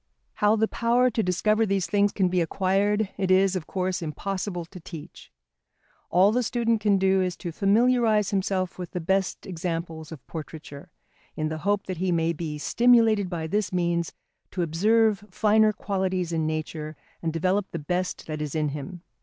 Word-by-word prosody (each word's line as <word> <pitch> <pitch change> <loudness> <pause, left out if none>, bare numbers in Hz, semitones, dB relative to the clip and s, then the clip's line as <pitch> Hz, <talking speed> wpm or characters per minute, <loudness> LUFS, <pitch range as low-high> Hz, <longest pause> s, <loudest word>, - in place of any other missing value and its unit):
How 210 +1 +3
the 220 0 +2
power 240 +3 +2
to 225 - 0
discover 215 +4 +2
these 195 -3 0
things 205 0 +2
can 190 -2 +1
be 180 0 +1
acquired, 195 +4 +1
it 190 -1 0
is, 190 0 +4
of 175 -5 -4
course, 185 -1 -2
impossible 180 +2 -4
to 180 +2 -12
teach. 165 -3 -11 0.8
All 185 +4 +5
the 245 +3 +1
student 230 -2 0
can 205 -2 +3
do 190 0 +3
is 180 -2 -1
to 175 - -5
familiarise 215 +2 +3
himself 190 -2 -1
with 180 - -6
the 180 - -2
best 190 +3 -1
examples 165 -3 -4
of 155 -6 -10
portraiture, 150 -2 -9 0.5
in 155 0 -1
the 155 0 -4
hope 200 +4 0
that 185 -2 -4
he 185 +1 0
may 165 0 +1
be 155 -2 -5
stimulated 225 +1 +3
by 170 -3 -3
this 205 +5 -1
means 170 -2 0 0.4
to 180 - -2
observe 210 +5 +2
finer 215 0 +3
qualities 190 -3 -2
in 160 -2 0
nature 155 0 -4 0.3
and 165 - -1
develop 185 +5 0
the - - -5
best 180 +4 -3
that 155 -1 -5
is 150 -1 -4
in 155 -1 +1
him. 150 +5 -7
185 Hz, 180 wpm, -26 LUFS, 165-205 Hz, 0.8 s, All